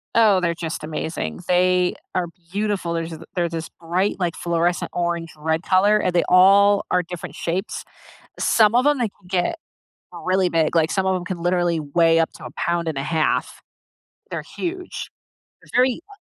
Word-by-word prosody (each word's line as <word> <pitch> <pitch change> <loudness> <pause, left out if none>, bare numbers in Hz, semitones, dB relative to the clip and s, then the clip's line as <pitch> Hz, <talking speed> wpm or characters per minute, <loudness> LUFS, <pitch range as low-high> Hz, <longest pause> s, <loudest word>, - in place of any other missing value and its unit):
Oh, 210 -5 +5
they're 170 -1 +1
just 160 -2 -5
amazing. 155 - -4
They 180 0 +3 0.2
are 180 - 0 0.3
beautiful. 200 -4 -1
There's 165 0 -3
this 160 - -8
they're 175 -2 0
this 165 -1 -5
bright, 175 +4 0
like, 175 -2 -1
fluorescent 170 +1 0
orange, 170 -1 -1
red 160 +2 -1
color, 200 +3 +4
and 185 - 0
they 175 - +3
all 200 +2 +6
are 180 - +3
different 175 0 -8
shapes. 180 +5 -3 0.5
Some 220 -1 +4
of 250 +1 +4
them, 290 -1 +3
they 240 -3 +1
can 200 -2 -24
get 180 - 0 0.6
really 185 0 +1
big, 165 -1 +1
like, 160 -1 +3
some 190 -2 0
of 190 0 +2
'em 180 -1 -4
can 180 -3 -5
literally 175 -1 +1
weigh 165 +2 +3
up 165 - +1
to - - -11
a - - -8
pound 170 -1 -1
and 155 -3 -2
a 135 - -2
half. 155 +1 0 0.7
They're - - -4
huge. 360 +1 -4 0.5
They're - - -20
very, 255 -1 +2
uh 405 - -15
175 Hz, 185 wpm, -22 LUFS, 165-195 Hz, 0.7 s, all